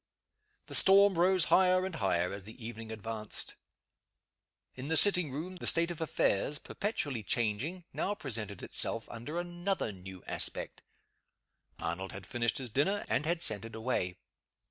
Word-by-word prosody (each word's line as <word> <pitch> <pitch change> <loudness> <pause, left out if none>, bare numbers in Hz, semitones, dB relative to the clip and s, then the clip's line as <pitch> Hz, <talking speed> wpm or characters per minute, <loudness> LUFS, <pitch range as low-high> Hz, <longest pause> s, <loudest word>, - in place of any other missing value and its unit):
The - - -10
storm 200 +1 +6
rose 180 0 +3
higher 185 0 +5
and 190 - -4
higher 90 - 0
as 100 -1 0
the 110 +2 -10
evening 115 -1 -7
advanced. 110 0 -2 1.2
In 130 +2 -7
the 160 +1 +3
sitting 180 -7 +5
room, 170 +7 -5
the - - -3
state 170 +1 +4
of 165 - -7
affairs, 150 -4 +1
perpetually 145 - -3
changing, 120 - -1
now 205 - -1
presented 110 - -4
itself 115 -1 +1
under 130 +8 -6
another 175 - -2
new 95 -1 -10
aspect. - - -1 1.0
Arnold 95 +3 -4
had 95 -1 -8
finished 115 +1 -1
his 125 -4 -5
dinner, 195 - +1
and 145 +4 0
had 170 0 +1
sent 105 -3 +3
it 115 -1 -9
away. 110 -6 -2
130 Hz, 150 wpm, -32 LUFS, 110-175 Hz, 1.2 s, storm